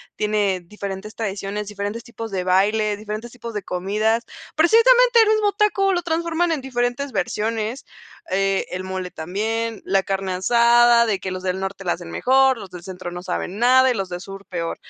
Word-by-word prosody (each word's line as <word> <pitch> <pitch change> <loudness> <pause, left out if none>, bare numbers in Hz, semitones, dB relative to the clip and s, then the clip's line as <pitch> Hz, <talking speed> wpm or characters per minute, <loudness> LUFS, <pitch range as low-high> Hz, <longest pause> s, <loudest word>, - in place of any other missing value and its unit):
tiene 205 -3 0
diferentes 200 +2 -7
tradiciones, 205 -1 -4
diferentes 205 +2 -5
tipos 230 -3 -8
de 185 -2 -2
baile, 205 +3 +2
diferentes 215 +3 -6
tipos 235 -2 -8
de 210 - -3
comidas. 210 +5 0 0.3
Precisamente 475 +7 +5
el 430 - +1
mismo 430 -1 +3
taco 390 -2 +2
lo 355 - 0
transforman 335 +1 0
en 300 - -3
diferentes 250 +1 -2
versiones, 220 +5 -2 0.5
eh, 195 0 +1
el 185 +1 -4
mole 185 -1 -5
también, 220 +6 -3
la 195 0 +2
carne 195 -1 -2
asada 235 +4 +5
de 210 -4 0
que 190 - -4
los 185 0 -5
del 185 0 -1
norte 195 0 -5
la 175 - +2
hacen 175 -1 -9
mejor. 265 0 +3
Los 195 -4 -10
del 180 -1 -9
centro 180 -1 -7
no 175 0 -6
saben 185 +2 -4
nada 260 +2 +5
y - - +1
los 195 -3 -3
del 175 0 -5
sur 195 +1 -10
peor. 165 -2 -3
210 Hz, 185 wpm, -22 LUFS, 190-245 Hz, 0.5 s, Precisamente